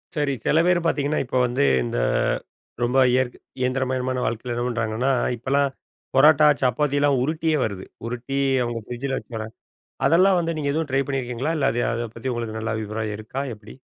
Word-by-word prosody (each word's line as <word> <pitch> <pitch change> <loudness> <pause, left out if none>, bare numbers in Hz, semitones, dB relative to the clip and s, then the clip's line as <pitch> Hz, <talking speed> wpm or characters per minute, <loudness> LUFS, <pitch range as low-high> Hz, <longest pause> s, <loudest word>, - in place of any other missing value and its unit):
சரி, 145 -2 +1
செல 160 - +4
பேர் 180 -1 +4
பாத்தீங்கன்னா, 150 -2 +1
இப்போ 125 - -2
வந்து 120 - +1 0.2
இந்த - - -3 0.9
ரொம்ப 125 +2 +1
இயற்க் 125 0 +1 0.2
இயந்திரமயமான 130 0 -1
வாழ்க்கையில 120 +2 -2
என்ன 120 0 -2
பண்ணுறாங்கன்னா, 115 +2 0 0.3
இப்பலாம் 140 +4 +1 0.5
பரோட்டா, 150 +2 +7
சப்பாத்திலாம் 140 +2 +2
உருட்டியே 155 +2 0
வருது. 100 -4 -4 0.2
உருட்டி, 125 +3 -3 0.2
அவுங்க 120 -1 -3
ஃப்ரிட்ஜில 130 +3 -3
வச்சர 110 -2 -6 0.6
அதெல்லாம் 185 +3 +5
வந்து 165 -1 -1
நீங்க 150 -2 -2
எதுவும் 160 +1 -1
ட்ரை 135 +1 +2
பண்ணியிருக்கீங்களா? 130 +1 -2
இல்ல 140 - +1
அது 120 - -1
அத 120 +1 -2
பத்தி 115 +3 -4
உங்களுக்கு 115 -2 -4
நல்ல 110 0 -2
அபிப்பிராயம் 110 0 -3
இருக்கா 110 +5 -5
எப்டி? 105 0 -13
130 Hz, 160 wpm, -23 LUFS, 120-145 Hz, 0.9 s, பரோட்டா